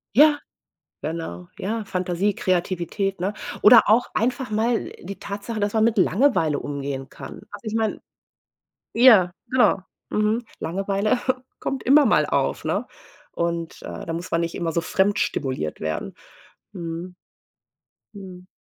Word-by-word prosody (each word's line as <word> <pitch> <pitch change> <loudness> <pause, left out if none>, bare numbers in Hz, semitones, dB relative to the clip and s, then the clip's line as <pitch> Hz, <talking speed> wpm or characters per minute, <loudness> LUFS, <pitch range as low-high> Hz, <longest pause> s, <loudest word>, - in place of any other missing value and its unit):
Ja, 295 +3 +7 0.6
genau, 150 - -5
ja, 220 +3 -2
Fantasie, 185 +2 0
Kreativität, 185 +1 -1
ne? 190 +3 0 0.3
Oder 225 +2 +9
auch 225 +4 +4
einfach 250 +1 -1
mal 225 +2 0
die 195 +2 -8
Tatsache, 205 +2 -5
dass 205 0 0
man 220 -1 +3
mit 230 0 +2
Langeweile 190 - +3
umgehen 140 -2 -4
kann. - - -10
Also, 205 +2 -10
ich 215 - -3
meine 225 -1 0 0.9
ja, 225 -7 +7 0.2
genau, 255 -4 +4 0.3
mhm. 215 +3 +1 0.2
Langeweile 195 +6 0 0.4
kommt 270 - -3
immer 285 +3 +6
mal - - +4
auf, - - -1
ne? - - -1 0.4
Und, 170 -1 -3
äh, - - -7
da 165 - -2
muss 170 +2 -5
man 165 - +2
nicht 170 0 -3
immer 170 -2 -2
so 170 - 0
fremd 195 +4 +1
stimuliert 130 - -2
werden. 80 0 -4 0.6
Mhm. 170 -1 -6 1.0
Mhm. 185 -3 -11
195 Hz, 140 wpm, -23 LUFS, 170-220 Hz, 1.0 s, Oder